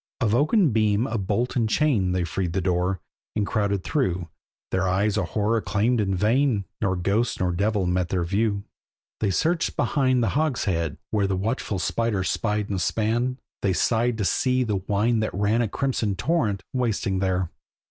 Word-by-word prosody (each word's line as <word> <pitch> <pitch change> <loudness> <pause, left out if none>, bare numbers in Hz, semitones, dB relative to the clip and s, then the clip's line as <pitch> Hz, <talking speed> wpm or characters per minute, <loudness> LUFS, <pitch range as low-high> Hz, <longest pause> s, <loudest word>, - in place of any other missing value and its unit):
Of 110 -5 +1
oaken 155 - +3
beam, 110 0 +2
of 110 -6 -3
bolt 115 +5 0
and 115 -3 +1
chain 110 -9 +2
They 90 -1 0
freed 85 +1 -2
the 95 - +1
door, 90 +1 0 0.4
and 105 -1 +1
crowded 100 -2 0
through, 90 - -1 0.4
Their 95 0 +1
eyes 100 +3 +1
a 105 - +1
horror 110 +6 0
claimed 105 +6 +1
in 95 -2 0
vain, 110 +1 +2 0.2
Nor 95 -1 +1
ghost 100 +6 0
nor 90 -2 +1
devil 100 +2 0
met 90 0 0
their 90 -2 0
view. 100 +3 0 0.6
They 105 - +1
searched 165 - 0
behind 130 -4 +2
the 110 - +2
hogshead, 95 - 0
where 105 -2 +1
The 95 -1 -1
watchful 105 0 -2
spider 110 0 0
spied 105 +1 -1
and 95 -3 -2
span; 120 +5 0 0.2
They 95 - +1
sighed 115 +4 +1
to 105 - -1
see 130 +5 +2
the 105 -4 -1
wine 105 +5 +1
that 110 -3 -2
ran 105 +4 +2
A 115 - +1
crimson 115 -4 -1
torrent, 105 - 0
wasting 110 -6 0
there. 95 -2 0
105 Hz, 180 wpm, -25 LUFS, 95-115 Hz, 0.6 s, oaken